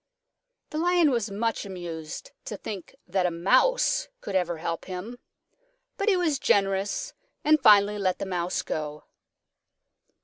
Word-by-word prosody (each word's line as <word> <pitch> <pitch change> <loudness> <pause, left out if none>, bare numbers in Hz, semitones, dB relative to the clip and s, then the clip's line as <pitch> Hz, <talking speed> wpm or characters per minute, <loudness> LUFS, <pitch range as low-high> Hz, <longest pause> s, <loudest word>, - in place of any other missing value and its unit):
The 310 - -2
Lion 345 -3 +4
was 230 -4 0
much 225 +3 -1
amused 175 - -7
to - - -5
think 200 -5 -7
that 185 -2 +1
a - - +1
Mouse 380 - +2
could - - -6
ever 175 -3 0
help 165 +1 -4
him. 195 +7 -6 0.8
But 400 +2 0
he 380 - +4
was 320 -6 +1
generous 200 - +1 0.3
and 305 0 +4
finally 205 -1 +6
let 185 -2 +1
the - - -4
Mouse 180 -2 -2
go. 150 -1 -4
200 Hz, 140 wpm, -27 LUFS, -, 0.8 s, finally